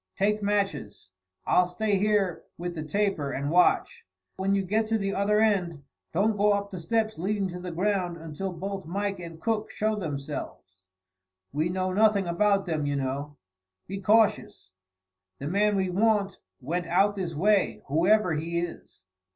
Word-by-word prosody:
Take 210 +2 +1
matches. 195 - -2 0.4
I'll 180 - +4
stay 200 +2 0
here 205 -4 +1 0.2
with 175 0 -4
the 160 - -5
taper, 180 -3 -1
and 140 +2 -2
watch. 320 - +3 0.3
When 195 +1 +1
you 195 - +1
get 215 +4 0
to 225 0 +1
the 195 -1 -2
other 210 +2 +2
end, 180 -9 +1 0.3
don't 205 +5 +1
go 205 +1 +4
up 200 0 -2
the 185 - -6
steps 220 +3 -1
leading 200 +2 0
to 180 0 -6
the 180 0 -6
ground 180 0 -1
until 165 +4 -5
both 190 0 -5
Mike 200 +2 -2
and 165 -2 -9
Cook 220 +1 -1
show 215 0 -1
themselves. 140 - -6 0.7
We 155 +4 0
know 185 +1 -1
nothing 210 -1 +3
about 195 +3 +2
them, 155 -4 -1
you 145 - 0
know. 140 +2 -3 0.5
Be 195 +1 -6
cautious. 210 - +2 0.7
The 140 - -5
man 205 +4 +2
we 190 -2 0
want 205 0 +1 0.2
went 165 +6 -3
out 195 +4 +3
this 180 -5 -4
way, 180 - +2
whoever 180 +5 +3
he 165 +2 -2
is." 170 - -6
190 Hz, 165 wpm, -27 LUFS, 165-205 Hz, 0.7 s, I'll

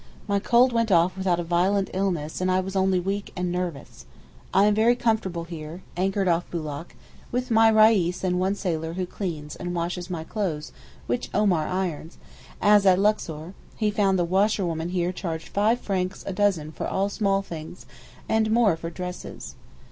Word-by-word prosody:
My 200 -1 +1
cold 240 +4 +4
went 230 -2 +1
off 175 +1 +4
without 185 -2 0
a - - -1
violent 185 +4 +1
illness 180 -5 -2
and 185 - +1
I 185 0 +3
was 190 +1 -4
only 190 -1 +2
weak 195 +3 -3
and 180 -1 -2
nervous. 175 -5 -5 0.4
I 195 +2 +5
am 210 - +4
very 225 +3 +4
comfortable 215 -8 0
here, 165 +1 -8
anchored 195 +2 0
off 170 0 +1
Boulak, 155 -1 -5 0.4
with 250 +1 -2
my 225 0 +6
Reis 215 -5 +4
and 180 -1 +1
one 190 +2 +1
sailor 165 -4 -2
who 185 +1 -2
cleans 160 -6 -5
and 175 0 -5
washes 175 +1 -3
my 170 -3 -4
clothes 165 -6 -3 0.3
which 120 - -2
Omar 185 -7 +2
irons, 180 -3 -3 0.4
as 205 -1 +5
at 185 -1 +6
Luxor, 175 -6 0
as - - -11 0.2
he 215 -2 0
found 200 -2 +2
the 175 - +1
washerwomen 180 -3 +1
here 180 -1 0
charged 165 -3 -5
five 215 +4 +2
francs 185 -3 -2
a 195 - -3
dozen 185 -6 +1
for - - -4
all 195 +1 0
small 200 -1 0
things 165 -1 -9 0.4
and 220 0 +2
more 220 -5 +4
for 165 +1 -6
dresses. 180 +1 -7
185 Hz, 180 wpm, -25 LUFS, 170-205 Hz, 0.4 s, my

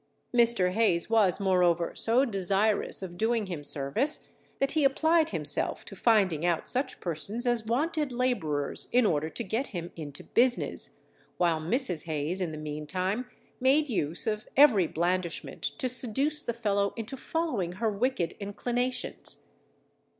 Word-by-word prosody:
Mr. 235 -6 +5
Hayes 210 -2 +1
was 210 -5 +4
moreover 180 -3 +2
so 240 +4 +2
desirous 200 -1 0
of 175 -2 -7
doing 225 0 +1
him 175 -6 -6
service 145 - -1 0.3
that 275 0 +1
he 310 - +1
applied 315 +4 +3
himself - - +1
to - - -9
finding 195 -9 +2
out 175 -2 0
such 260 +3 -1
persons 195 +8 -2
as 240 -3 +1
wanted 295 +4 0
labourers 200 - -1
in 250 -1 +4
order 155 -4 +1
to 235 - -5
get 225 +7 -2
him 175 -3 -6
into 145 -4 -8
business, 245 +1 +1 0.4
while 170 -3 +2
Mrs. 180 - 0
Hayes, 160 +3 -2
in 175 -3 -1
the 155 - -6
meantime, 180 +10 -3 0.3
made 275 +4 +3
use 165 - +1
of 215 -1 -2
every 235 - +6
blandishment 175 +1 -2
to 275 -5 -2
seduce 265 +5 -1
the - - -1
fellow 200 -3 0
into 230 +4 -5
following 260 - -2
her 220 +3 -1
wicked 210 -5 -1
inclinations. 245 +5 -3
210 Hz, 145 wpm, -28 LUFS, 175-250 Hz, 0.4 s, every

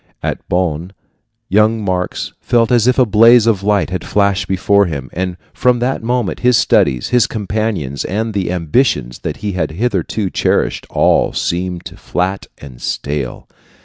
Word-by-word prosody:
At - - -2
Bonn 90 0 -1 0.5
young 110 +1 +2
Marx 90 -1 -2
felt 120 -1 +2
as 120 -1 +3
if 125 - +3
a 130 - +5
blaze 115 +2 +6
of 110 -4 +2
light 100 -2 +1
had 95 - -3
flashed 100 -2 +1
before 100 +1 +2
him; 70 -5 -5
and 90 0 -3 0.2
from 125 -1 +2
that 125 +3 -1
moment 120 -2 -1
his 125 -1 +4
studies, 65 - +2
his 125 -2 +3
companions, 105 - -3
and 110 +3 -2
the 95 -3 -1
ambitions 85 - 0
that - - -4
he 105 - 0
had 85 -5 -2
hitherto 100 +1 -2
cherished - - 0
all - - +2
seemed 90 0 -2
flat 95 +2 -2
and 65 -4 -12
stale. 70 -3 -4
100 Hz, 155 wpm, -16 LUFS, 90-115 Hz, 0.5 s, blaze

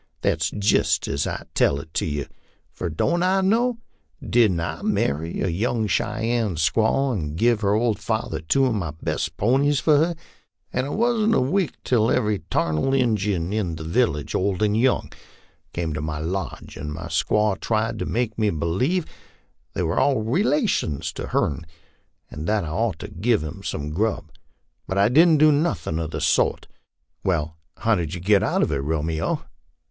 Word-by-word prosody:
That's 80 +1 +1
jist 105 +3 +1
as 70 - -1
I - - -5
tell 70 - +2
it 80 +2 -11
to - - 0
you 75 -2 -2 0.5
fur 90 - -4
don't 125 - 0
I 190 +2 +3
know? 230 +5 +2 0.5
Didn't 110 -7 +3
I 85 - -4
marry 80 +4 -1
a - - +1
young 110 +6 0
Cheyenne 110 -1 0
squaw 110 - +2
and 75 -8 -3
give 115 +2 +2
her 100 0 +2
old 110 -1 +1
father 110 -8 -2
two 135 - +2
of 125 - +1
my 85 -8 -3
best 80 0 -2
ponies 135 +6 +2
for 150 +2 +4
her, 165 +3 +2 0.6
and 130 +2 0
it 145 - -4
wasn't 225 -1 +2
a - - +4
week 165 +7 0
till 115 -2 +2
every 105 -2 +1
tarnal 80 +13 +1
Injun 105 -8 0
in 95 -7 -1
the 80 - -7
village, 80 - 0
old 95 +1 0
and 105 0 +2
young, 125 +3 +1 0.6
came 85 -2 -3
to 75 - -3
my 75 0 -3
lodge, 85 +4 -4
and 75 0 -5
my 80 +3 -6
squaw 100 +6 +1
tried 110 0 -1
to - - -2
make 115 -2 -2
me 105 -1 +3
b'lieve 100 - 0 0.7
they - - -1
were 80 -1 0
all 135 -6 +2
relations 175 - 0
of - - -5
hern, 75 +3 0 0.7
and 75 +2 -6
that 105 -1 +1
I 80 - -5
ought 95 +3 -1
to - - -5
give 110 0 0
'em 80 +5 -7
some 75 -6 -4
grub; 100 -1 -1 0.6
but 95 - -2
I 100 +2 +4
didn't 160 +5 +6
do 155 +1 +6
nothin' 105 - 0
of 80 -2 -3
the - - -4
sort." - - +1 0.3
" - - -50
Well, 80 -4 -1 0.2
how 115 - +2
did 85 -4 -1
you - - -5
get 100 +3 +3
out - - +1
of - - 0
it, 70 - 0
Romeo? 80 +2 -1
105 Hz, 185 wpm, -23 LUFS, 80-125 Hz, 0.7 s, didn't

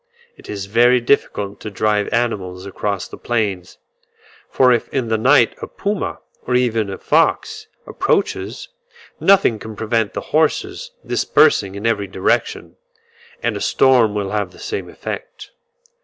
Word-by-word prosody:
It - - -16
is 100 -2 -4
very 120 +5 +4
difficult 105 -5 0
to 110 - -6
drive 105 0 0
animals 100 -6 -2
across 100 0 -3
the - - -11
plains; 100 -7 -2 0.7
for 130 -1 +4
if 120 - -1
in 130 -4 -2
the 110 - +2
night 125 0 +4
a - - -5
puma, 205 0 -3 0.3
or 125 - +1
even 115 -4 +1
a 95 - -5
fox, 435 - +1 0.2
approaches, - - -1 0.5
nothing 195 - +4
can 110 0 -8
prevent 110 0 -1
the - - -3
horses 385 - 0 0.2
dispersing 100 -11 +2
in 100 +2 -6
every 105 -3 0
direction; 95 0 -1 0.7
and - - 0
a - - -5
storm 125 -6 +3
will 100 -2 -2
have 105 -3 -1
the - - -18
same 425 - -5
effect. - - -8
110 Hz, 145 wpm, -19 LUFS, 100-130 Hz, 0.7 s, very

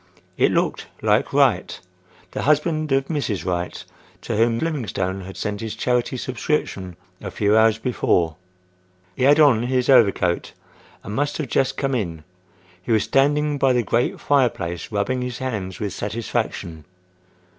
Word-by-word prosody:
It - - +3
looked - - -1 0.2
like - - +2
Wright,—the - - -2
husband 155 +1 +1
of 135 0 +2
Mrs. 115 - -2
Wright 90 -1 -3 0.4
to - - -3
whom 115 +1 +2
Livingstone 105 - -2
had 95 +1 -9
sent 105 0 -3
his 110 -1 -4
charity 125 +1 0
subscription 115 - -2 0.3
a - - -5
few 105 0 +1
hours 110 0 +4
before. 90 -8 0 0.8
He 130 - +1
had 145 +2 +6
on 140 -7 +5
his 125 +1 0
overcoat 100 -8 +3 0.5
and 105 - -6
must 145 +5 -1
have 150 -6 -4
just 135 - +1
come 135 -1 -1
in. 85 -10 -3 0.6
He 90 - -5
was 110 -2 +3
standing 145 +1 +2
by 135 -1 +3
the 120 -1 +2
great 120 +2 0
fire 140 -4 +3
place 85 -2 -6
rubbing 115 +5 -1
his 125 -1 -4
hands 105 -9 -4
with 100 -3 -3
satisfaction. 105 -7 -4
120 Hz, 150 wpm, -22 LUFS, 100-135 Hz, 0.8 s, had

